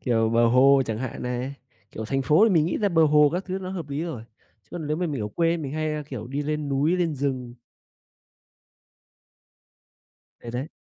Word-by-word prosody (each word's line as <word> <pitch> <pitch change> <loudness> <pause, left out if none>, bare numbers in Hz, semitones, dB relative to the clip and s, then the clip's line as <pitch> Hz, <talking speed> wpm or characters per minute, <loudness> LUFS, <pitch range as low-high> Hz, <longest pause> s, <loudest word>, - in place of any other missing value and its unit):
kiểu, 115 -3 +1
bờ 115 +1 +4
hồ 135 +3 +5
chẳng 110 -1 -3
hạn 130 -1 -5
này. 125 +2 -3 0.4
Kiểu, 110 - -6
thành 135 +4 -1
phố 150 +10 +5
thì - - 0
mình 160 -1 +4
nghĩ - - -1
ra 205 -2 +2
bờ 165 -3 +4
hồ 150 -1 +5
các 180 +3 -2
thứ 190 0 -3
nó 185 -1 -6
hợp 170 -6 -5
lý 145 +3 -3
rồi, 155 -10 -5 0.4
chứ - - -36
còn 165 -3 -5
nếu 150 +1 -1
mà 180 0 -1
mình 140 -7 -3
ở 105 - -3
quê 165 +8 +1
mình 140 -4 -5
hay, 155 0 -2
a, 150 - -3
kiểu, 130 -6 -7
đi 140 +3 -3
lên 150 0 -2
núi 145 +6 +1
lên 170 -3 0
rừng. 130 -3 -3 2.9
Đấy, 120 - -8
đấy, 125 +5 -3
145 Hz, 215 wpm, -25 LUFS, 125-160 Hz, 2.9 s, hồ